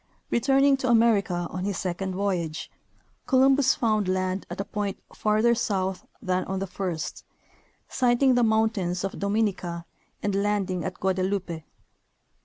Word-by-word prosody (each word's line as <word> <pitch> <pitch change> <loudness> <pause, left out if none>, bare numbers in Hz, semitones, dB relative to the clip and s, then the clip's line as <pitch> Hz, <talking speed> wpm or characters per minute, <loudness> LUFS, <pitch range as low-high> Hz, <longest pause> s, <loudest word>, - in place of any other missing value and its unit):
Returning 270 +3 +4
to 260 -1 -1
America 210 -7 +3
on 185 - -4
his 200 -2 -2
second 185 +1 -3
voyage, 180 -5 -2 0.6
Columbus 270 +1 +4
found 215 -7 +1
land 185 +1 -1
at - - -6
a 200 - -2
point 205 -2 -3 0.2
farther 215 +2 +2
south 190 -5 -1 0.2
than 185 0 0
on 190 - -3
the 195 - -2
first, 180 -4 -4 0.6
sighting 255 +1 +3
the 245 - +3
mountains 220 -6 +1
of 195 - -4
Dominica 200 -5 -1 0.4
and 205 - 0
landing 195 -3 0
at 185 -1 -4
Guadeloupe. 185 -3 -1
200 Hz, 135 wpm, -26 LUFS, 185-225 Hz, 0.6 s, Returning